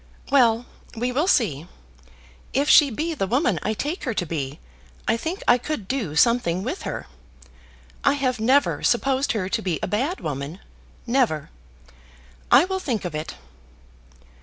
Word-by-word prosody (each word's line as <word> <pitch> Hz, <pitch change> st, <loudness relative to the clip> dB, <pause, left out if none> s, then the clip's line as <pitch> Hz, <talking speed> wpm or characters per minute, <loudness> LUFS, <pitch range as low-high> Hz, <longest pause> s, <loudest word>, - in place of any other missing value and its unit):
"Well, 240 Hz, -4 st, +4 dB, 0.3 s
we 245 Hz, +2 st, -1 dB
will 295 Hz, +8 st, 0 dB
see. 170 Hz, -, +1 dB, 0.9 s
If 280 Hz, +2 st, +1 dB
she 295 Hz, -2 st, +7 dB
be 315 Hz, +8 st, -2 dB
the 195 Hz, -11 st, -2 dB
woman 245 Hz, -, +1 dB
I 215 Hz, -, -1 dB
take 300 Hz, -, -3 dB
her 250 Hz, -4 st, -2 dB
to 180 Hz, -, -1 dB
be, 145 Hz, -3 st, -4 dB, 0.5 s
I -, -, +3 dB
think 325 Hz, +10 st, -4 dB
I 245 Hz, +1 st, +5 dB
could 245 Hz, -7 st, -4 dB
do 220 Hz, -, -2 dB
something 190 Hz, -4 st, +3 dB
with 285 Hz, -, -4 dB
her. -, -, -5 dB, 1.0 s
I 280 Hz, -, +4 dB
have 260 Hz, -4 st, -1 dB
never 260 Hz, +6 st, +2 dB
supposed 270 Hz, +3 st, +1 dB
her 200 Hz, -5 st, -2 dB
to -, -, -1 dB
be 175 Hz, -4 st, -2 dB
a -, -, 0 dB
bad 265 Hz, -, -1 dB
woman, 145 Hz, +4 st, -5 dB, 0.5 s
never. 235 Hz, -, 0 dB, 1.0 s
I 275 Hz, +7 st, +7 dB
will 380 Hz, 0 st, -2 dB
think 240 Hz, -, -2 dB
of 175 Hz, -, -4 dB
it." 155 Hz, +1 st, -5 dB
240 Hz, 160 wpm, -23 LUFS, 185-280 Hz, 1.0 s, she